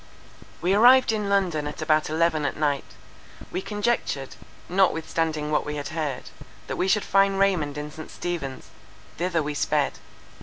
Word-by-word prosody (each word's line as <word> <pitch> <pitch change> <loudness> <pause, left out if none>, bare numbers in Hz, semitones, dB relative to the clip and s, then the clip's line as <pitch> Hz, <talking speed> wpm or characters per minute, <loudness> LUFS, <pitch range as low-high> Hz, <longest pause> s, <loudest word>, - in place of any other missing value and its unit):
We 180 +2 +3
arrived 245 +4 +6
in 210 -2 -1
London 180 -7 +1
at 150 - -7
about 155 -1 +2
eleven 160 -1 +1
at 145 - -2
night. 145 -2 -1 0.6
We - - -2
conjectured, 205 - -2 0.3
notwithstanding 160 -4 0
what 150 - +2
we 150 - -4
had 145 -1 -4
heard, 155 -5 -4 0.3
that - - -4
we 185 - 0
should 205 +2 +2
find 195 0 +3
Raymond 180 -8 +1
in 150 0 -5
St. 155 +1 -9
Stephen's: 160 -7 -5 0.5
thither 170 -2 0
we 150 +1 -3
sped. 145 0 0
160 Hz, 155 wpm, -25 LUFS, 150-195 Hz, 0.6 s, arrived